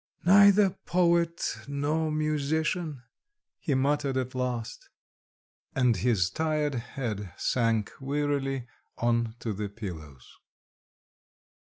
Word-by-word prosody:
"Neither 200 +1 +7 0.2
poet 170 -1 +2
nor 145 +3 0
musician!" 155 0 -1 0.6
he 140 - 0
muttered 140 0 +1
at 130 0 -2
last... 125 - -4 0.9
And 125 -3 +3
his 95 -5 +2
tired 155 -1 0
head 115 -5 -4
sank 115 -4 +1
wearily 135 -2 -1 0.3
on 115 -1 0
to 110 - -2
the 100 +1 -4
pillows. 80 - -8
135 Hz, 90 wpm, -28 LUFS, 115-155 Hz, 0.9 s, Neither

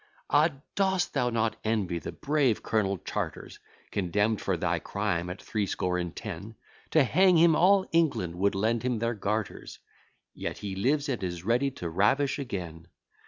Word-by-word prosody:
Ah! 150 +3 +5 0.2
dost 190 -4 +1
thou 125 -3 +1
not 115 -2 0
envy 100 -6 0
the - - -6
brave 140 -6 +1
Colonel 100 -3 0
Chartres, - - -5 0.3
Condemn'd 100 +3 0
for - - 0
thy - - 0
crime 85 +1 -2
at 90 +1 -6
threescore 90 -3 -1
and 85 -2 -4
ten? 105 0 -7 0.3
To 155 - +5
hang 180 +6 +4
him, 165 -1 +6
all 190 +3 +5
England 140 - +1
would 100 +1 +2
lend 110 +3 +1
him 125 -1 0
their 115 +2 0
garters, 105 0 -3 0.6
Yet - - -5
he 100 -2 -5
lives, 140 +9 +1
and 130 -6 -2
is 85 -2 -4
ready 125 +5 +2
to 85 - -4
ravish 120 - +2
again. 85 - -6
110 Hz, 165 wpm, -28 LUFS, 95-140 Hz, 0.6 s, him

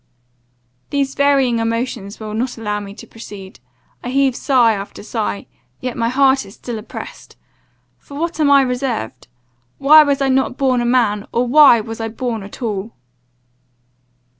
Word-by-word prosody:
"These 275 -1 -1
varying 275 -4 +2
emotions 230 -2 -3
will 215 -1 -6
not 240 +3 -3
allow 210 -2 -3
me 200 -1 -9
to - - -11
proceed. 200 - -11 0.4
I 245 - -4
heave 270 -1 +2
sigh 245 -5 +3
after 200 0 -7
sigh; 215 -2 -3 0.3
yet 250 -2 -4
my 230 -1 0
heart 265 +1 +3
is 195 - -14
still 235 -3 -6
oppressed. 215 - -10 0.6
For 280 - -11
what 335 0 -3
am 300 -2 +3
I 280 -1 +6
reserved? 250 - -3 0.5
Why 300 +3 +7
was 285 -2 +1
I 275 - +1
not 265 -1 +1
born 260 -3 +1
a - - -1
man, 230 -4 +1
or 240 +1 +1
why 275 -3 +7
was 225 +1 -7
I 225 - -2
born 230 0 -4
at 200 +6 -10
all?" 215 -1 -3
240 Hz, 165 wpm, -18 LUFS, 220-270 Hz, 0.6 s, Why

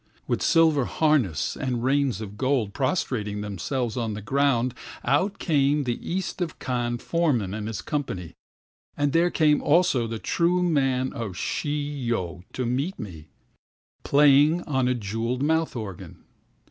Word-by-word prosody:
With - - -1
silver 160 -6 +4
harness 135 - +1
and 125 -3 -2
reins 135 -5 +1
of 105 -1 -7
gold, 130 -4 0
prostrating 120 - -1
themselves 110 - -3
on 115 -3 -2
the 105 - -6
ground, 130 -1 +1 0.3
Out 185 +8 +1
came 145 -2 +2
the 120 -3 -2
East 185 +1 -3
of 170 -3 -3
Kan 120 -1 -2
foreman 125 - 0
and 105 0 -4
his 110 -3 -5
company; 100 - -3 0.6
And 145 -1 +1
there 170 +2 +4
came 150 -3 +3
also 145 -7 +3
the 115 0 -4
"True 175 +9 +1
man" 135 -6 +1
of 105 -6 -5
Shi 145 +5 -2
yo 115 - -3
to 130 - -2
meet 135 +10 -1
me, 80 -7 -8 0.8
Playing 145 +4 +5
on 130 -4 0
a 125 - +2
jewelled 115 +4 -2
mouth 160 0 +1
organ. 105 -6 -7
130 Hz, 145 wpm, -25 LUFS, 115-150 Hz, 0.8 s, Playing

